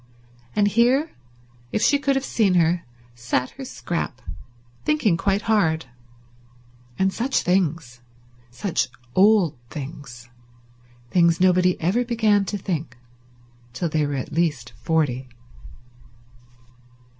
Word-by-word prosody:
And 205 -1 +3
here, 250 +8 +2 0.6
if 215 - 0
she 285 - +4
could 280 -1 +1
have 270 0 -1
seen 200 -5 +2
her, 170 0 +2 0.3
sat 120 +2 -2
her 270 - -9
Scrap 170 - -4 0.6
thinking 275 - +2
quite 195 +4 0
hard. 165 -9 +1 1.1
And 190 0 +1
such 260 +4 0
things. 165 -9 0 0.5
Such 165 - -1 0.3
old 190 - +4
things. 135 -4 -8 0.8
Things 170 -2 +3
nobody 180 0 +3
ever 190 +9 +1
began 220 -4 +2
to 205 - -3
think 160 -10 -4 0.8
till 165 +6 -2
they 155 0 +1
were 145 - -3
at 130 - -4
least 145 -8 -1
forty. 140 -6 0
180 Hz, 110 wpm, -23 LUFS, 150-210 Hz, 1.1 s, she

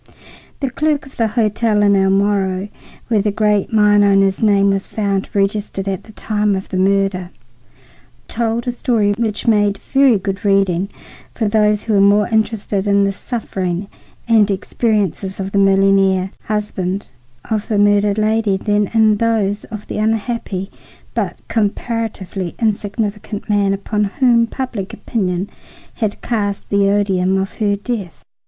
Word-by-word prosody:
The 270 -2 -1
clerk 300 +1 0
of 270 - -15
the 230 - +1
hotel 215 -1 +1
in 200 -1 +4
El 190 0 +3
Moro, 195 -1 +1 0.4
where 220 -3 +2
the 210 +1 0
great 210 0 +1
mine 210 -1 +4
owner's 195 -1 +3
name 200 -2 +4
was 195 0 -2
found 200 -2 -2
registered 200 -1 -1
at 190 -2 -3
the 220 - -13
time 210 -1 0
of 190 - -5
the 185 - -3
murder, 195 -1 +1 1.0
told 230 0 -2
a 245 - 0
story 230 -4 +1
which 220 -3 -1
made 205 -3 +3
very 270 0 +3
good 195 0 -4
reading 195 -2 +2 0.5
for 220 - 0
those 210 0 +2
who 225 - -1
were 200 - +4
more 205 +1 +4
interested 215 -3 -1
in 200 0 +3
the 195 - +1
sufferings 190 -5 -3 0.4
and 220 -3 +4
experiences 200 -1 -1
of 195 0 -4
the 200 - +1
millionaire 195 -1 +3
husband 200 -4 -3 0.4
of 215 -1 -1
the 215 - 0
murdered 205 0 +3
lady 215 -2 +1
than 205 0 0
in 215 -1 +4
those 210 -3 0
of 215 -2 -8
the - - -5
unhappy 215 -3 -2 0.4
but - - -2
comparatively 205 -4 -2
insignificant 210 -1 -2
man 205 -2 +2
upon 210 +2 -1
whom 235 +2 +2
public 230 -7 -5
opinion 185 -4 -2 0.5
had 215 -4 -3
cast 205 -4 -2
the 200 -1 +2
odium 190 -2 +1
of 195 +1 -2
her 205 -2 +1
death. 200 -4 -5
205 Hz, 150 wpm, -18 LUFS, 195-220 Hz, 1.0 s, in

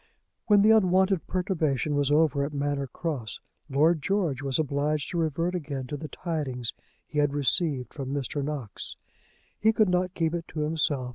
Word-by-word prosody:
When 205 -2 +6
the 215 - +6
unwonted 190 -3 +3
perturbation 160 -6 0
was 145 -1 +1
over 145 -2 +3
at 145 +1 -3
Manor 140 -1 -1
Cross 130 -5 -4 0.3
Lord 155 +4 +3
George 170 -7 0
was 135 -2 0
obliged 145 -1 0
to 175 - -1
revert 165 +2 0
again 145 -6 -4
to 135 - -5
the 155 +2 -6
tidings 140 -10 -3 0.3
he 150 - -3
had 145 -1 +2
received 140 -3 +1
from 135 -3 -5
Mr. 140 0 -2
Knox. 140 -7 -5 0.6
He 220 +1 +4
could 215 -3 +3
not 180 0 0
keep 165 -1 0
it 170 -1 -3
to 155 - -4
himself. 150 -4 0
150 Hz, 170 wpm, -27 LUFS, 140-175 Hz, 0.6 s, When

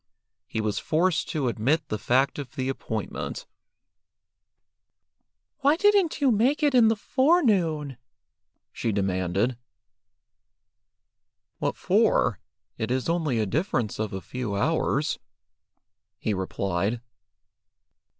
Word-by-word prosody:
He 110 - -2
was 105 -1 -1
forced 160 0 +1
to 145 -5 -1
admit 140 +7 0
the 110 - -2
fact 130 +6 +1
of 145 +2 -8
the 130 -2 -2
appointment. 135 - -4 2.1
"Why 285 +2 +4
didn't 395 -3 +3
you 275 -3 +4
make 255 +8 +2
it 290 -2 +3
in 240 -3 +6
the 225 - +3
forenoon?" 200 - +2 0.7
she 115 - -2
demanded. 95 +4 0 2.0
"What - - -1
for? - - +2 0.4
It 110 - -2
is 130 +1 -1
only 160 -7 0
a 110 - +1
difference 120 - -1
of 110 -1 -2
a 95 - -5
few 125 -3 -4
hours," 150 +4 0 1.0
he 110 - -1
replied. 95 +3 -1
135 Hz, 110 wpm, -26 LUFS, -, 2.1 s, in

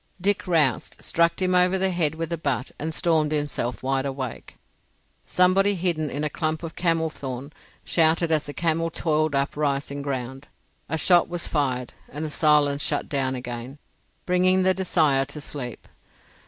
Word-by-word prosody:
Dick 200 +1 0
roused, 155 -9 +1
struck 170 0 +1
him 185 -1 +1
over 180 +1 +4
the 190 0 +1
head 160 -4 0
with 165 0 -4
the 170 - -1
butt, 135 -5 -2
and 160 +2 -3
stormed 160 -2 +1
himself 145 -5 -2
wide 135 0 0
awake. 130 -3 -6 0.7
Somebody 195 +3 +3
hidden 165 -4 -1
in 145 +3 -3
a - - +1
clump 155 +2 -2
of 165 - -6
camel 165 -2 +1
thorn 135 +1 -7 0.3
shouted 165 0 +3
as 155 -2 +1
the 145 - -6
camel 165 0 0
toiled 155 -2 0
up 140 0 0
rising 140 -1 -1
ground. 135 0 -5 0.4
A 160 - 0
shot 175 +2 +4
was 175 -1 -3
fired, 130 -5 -1 0.2
and 150 +3 -5
the 155 - -5
silence 150 -2 +3
shut - - -1
down 135 -2 0
again, 125 +2 -6 0.5
bringing 185 +1 +3
the 190 0 +4
desire 160 -7 +2
to 140 +2 -8
sleep. 130 -5 -6
155 Hz, 170 wpm, -24 LUFS, 140-170 Hz, 0.7 s, over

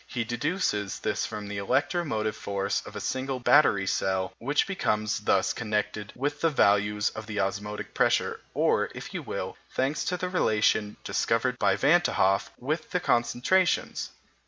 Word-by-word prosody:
He 120 - -2
deduces 120 - -1
this - - -1
from 105 -1 -6
the 100 0 -4
electromotive 120 - 0
force 100 -1 -2
of - - -10
a - - -3
single 130 0 -2
battery 120 -7 +4
cell 95 -1 0
which 145 +5 +1
becomes 110 - -1
thus 100 -2 +2
connected 105 -2 -2
with 145 +3 -2
the 165 - +4
values 105 -5 +2
of 110 -1 -8
the 105 -2 -3
osmotic 105 +2 -3
pressures, - - +1
or, - - +2
if - - -8
you - - -3
will, - - -5 0.2
thanks 135 +4 0
to 180 - -1
the 180 - -2
relation 110 - +1
discovered 115 +5 0
by 100 -1 +3
Van 150 +10 +4
t' 175 - -1
Hoff, 95 +1 +2
with 155 +5 -3
the 180 - 0
concentrations. 125 +9 +1
110 Hz, 160 wpm, -27 LUFS, 105-145 Hz, 0.2 s, battery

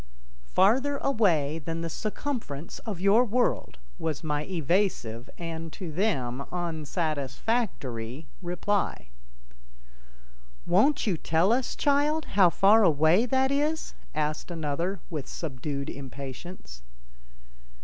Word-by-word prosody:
"Farther 260 - +3
away 170 - +2
than 165 +1 -4
the 165 - -2
circumference 215 - -4
of 200 -6 -3
your 200 +6 +5
world," 240 - 0 0.2
was 155 -2 -2
my 150 -1 -1
evasive 165 - 0
and, 165 -1 -5
to 180 -5 -6
them, 140 - 0
unsatisfactory 155 - -2 0.2
reply. 180 - -1 1.6
"Won't 210 +12 +3
you 195 -6 +1
tell 165 +7 +2
us, 250 0 0
child, 295 +2 +2
how 195 -3 +6
far 205 +6 +5
away 165 - +4
that 265 +2 +2
is?" 300 +3 0 0.2
asked 155 +2 -1
another 170 +3 -2
with 150 -5 -4
subdued 140 -2 -4
impatience. 135 - -8
170 Hz, 105 wpm, -28 LUFS, 150-215 Hz, 1.6 s, how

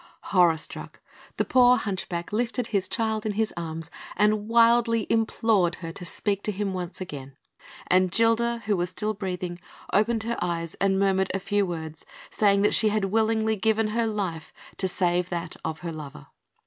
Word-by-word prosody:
Horror 175 -4 +5
struck, 155 - -7 0.4
the - - +1
poor 250 -1 +5
hunchback 185 -4 -4
lifted 240 +2 -1
his 200 -4 -1
child 220 -1 -1
in 215 - -2
his 220 +1 0
arms, 165 -1 -4 0.2
and 210 +1 +2
wildly 230 -1 +4
implored 220 -5 +2
her 165 -2 -7
to 180 - -9
speak 200 +3 -1
to 210 - -1
him 200 -1 -2
once 180 -1 -5
again; 140 -7 -8 0.5
and 185 0 +3
Gilda, 230 +3 +2
who 210 -1 +2
was 175 -1 -1
still 215 +3 -2
breathing, 180 -3 -4 0.3
opened 220 +2 +2
her 235 +1 -2
eyes 170 -2 -2
and 195 -1 +3
murmured 190 -1 +2
a - - 0
few 200 0 0
words, 160 -2 -6 0.3
saying 200 -1 +3
that 210 - +3
she 215 - +5
had 210 -1 0
willingly 220 0 +2
given 220 +1 +1
her 230 +1 0
life 190 -7 -3 0.3
to 190 - 0
save 180 -1 0
that 170 -1 -4
of 160 0 -4
her 170 -2 -4
lover. 145 - -9
200 Hz, 175 wpm, -26 LUFS, 175-220 Hz, 0.5 s, Horror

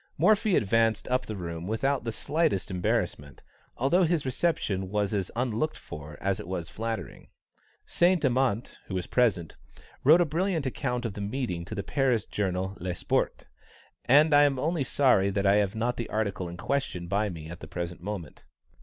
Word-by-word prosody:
Morphy 215 -2 +4
advanced 115 +1 +2
up 125 0 0
the 110 - -4
room 85 -2 -5
without 135 +4 0
the 115 - -1
slightest 150 - 0
embarrassment, 75 -5 -2 0.3
although 140 +9 +3
his 170 -4 +2
reception 120 - -1
was 105 0 0
as 95 -3 -1
unlooked 125 +5 -1
for 75 0 -9
as 100 -1 -1
it - - -7
was 90 -2 -4
flattering. 115 0 -5 0.6
Saint 175 -2 +2
Amant, 125 -3 0
who 95 - -4
was 90 -1 -2
present, 105 -10 +1 0.5
wrote 155 +6 +7
a 175 - +4
brilliant 165 0 -1
account 125 -2 -2
of 110 - -2
the 105 - -6
meeting 100 -5 -3
to - - -6
the 100 - -3
Paris 130 -6 +1
journal 95 -1 -2
Le 90 0 -3
Sport, - - -1 0.6
and 150 +4 +5
I 145 - +8
am 145 -2 +3
only 155 +2 0
sorry 125 -8 +3
that 100 0 -1
I 100 +1 +5
have 100 -1 +1
not 120 +2 -1
the 115 - -4
article 100 -4 -2
in 85 - -8
question 110 -8 -2
by 100 +4 0
me 80 -4 -7
at 85 +1 -8
the - - -9
present 85 -1 -5
moment. 90 -8 -6
110 Hz, 180 wpm, -28 LUFS, 95-135 Hz, 0.6 s, I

